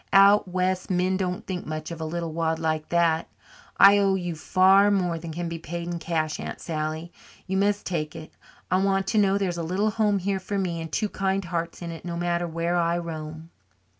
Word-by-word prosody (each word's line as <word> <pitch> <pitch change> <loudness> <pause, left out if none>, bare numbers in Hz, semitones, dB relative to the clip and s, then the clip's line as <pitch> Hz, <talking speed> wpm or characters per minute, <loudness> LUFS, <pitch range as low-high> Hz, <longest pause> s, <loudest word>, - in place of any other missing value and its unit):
"Out 200 +1 +7
west 185 0 -1
men 185 0 +1
don't 180 -1 -2
think 180 -2 -5
much 155 +1 -5
of 165 -1 -6
a - - -2
little 165 0 -3
wad 160 0 0
like 155 -1 -2
that. 170 -2 +2 0.5
I 200 +1 +8
owe 195 -1 +3
you 175 -2 -3
far 190 +5 +4
more 180 -4 +1
than 165 0 -7
can 170 +2 -4
be 165 0 -5
paid 170 +1 -5
in 175 -1 -3
cash, 155 -2 -2
Aunt - - -6
Sally. 160 +1 -4 0.3
You 190 +1 -1
must 205 +1 +1
take 155 -3 -3
it 160 -1 -9 0.4
I 185 +1 +3
want 195 -1 +1
to 220 - +2
know 200 -1 +3
there's 180 -4 -1
a - - -1
little 190 +6 0
home 210 -2 +2
here 195 +1 -1
for 200 +2 -4
me 175 -4 -2
and 160 -1 -7
two 215 - 0
kind 195 -1 -1
hearts 170 0 -4
in 170 - -4
it, 165 - -9
no 170 -1 -4
matter 175 0 0
where 170 +1 -1
I 170 0 +1
roam." 160 -1 -6
175 Hz, 220 wpm, -25 LUFS, 165-190 Hz, 0.5 s, I